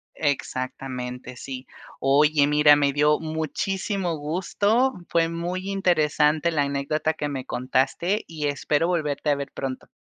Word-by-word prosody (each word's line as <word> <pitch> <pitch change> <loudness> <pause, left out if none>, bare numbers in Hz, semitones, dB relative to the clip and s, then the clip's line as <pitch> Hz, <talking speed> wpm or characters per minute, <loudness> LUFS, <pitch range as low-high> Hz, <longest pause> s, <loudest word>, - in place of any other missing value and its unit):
Exactamente, 130 -3 -3
sí. 130 0 -7 0.3
Oye, 145 +2 +4
mira, 150 0 +6
me 145 -1 +2
dio 150 +1 +3
muchísimo 170 +3 -2
gusto, 200 - +1 0.2
fue 165 -1 +2
muy 180 +3 -4
interesante 155 -3 +2
la 150 -3 +2
anécdota 140 +3 -1
que 145 -2 -3
me 135 -2 -4
contaste, 135 - 0
y 155 -3 -3
espero 145 +3 0
volverte 150 -4 -1
a 145 - +4
ver 140 -1 -5
pronto. 130 -1 -5
150 Hz, 130 wpm, -24 LUFS, 140-170 Hz, 0.3 s, mira